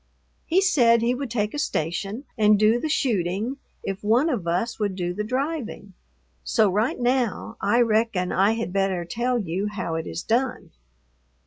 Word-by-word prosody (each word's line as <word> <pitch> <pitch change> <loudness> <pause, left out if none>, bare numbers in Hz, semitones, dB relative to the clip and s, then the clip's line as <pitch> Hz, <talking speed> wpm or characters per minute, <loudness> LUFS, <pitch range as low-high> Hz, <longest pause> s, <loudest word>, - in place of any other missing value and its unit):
He 360 +4 +3
said 240 -11 +4
he 240 +1 +2
would 265 0 -4
take 210 -2 -1
a 295 - -3
station 195 - -2
and 210 -2 +4
do 215 +3 +4
the 310 - -3
shooting 220 - 0 0.3
if 195 +1 -4
one 240 +10 +3
of 200 -10 -3
us 180 +9 -1
would 205 -3 -1
do 175 -1 -2
the 210 +3 -3
driving. 255 -4 -3 0.5
So 215 -5 +2
right 215 +6 0
now 245 -3 0
I 205 +5 +3
reckon 220 -5 +1
I 200 +4 +3
had 225 -5 -4
better 195 -3 0
tell 240 +8 -1
you 195 -1 -2
how 200 -5 -4
it 160 0 -3
is - - -5
done. 245 +3 -1
220 Hz, 175 wpm, -24 LUFS, 195-245 Hz, 0.5 s, said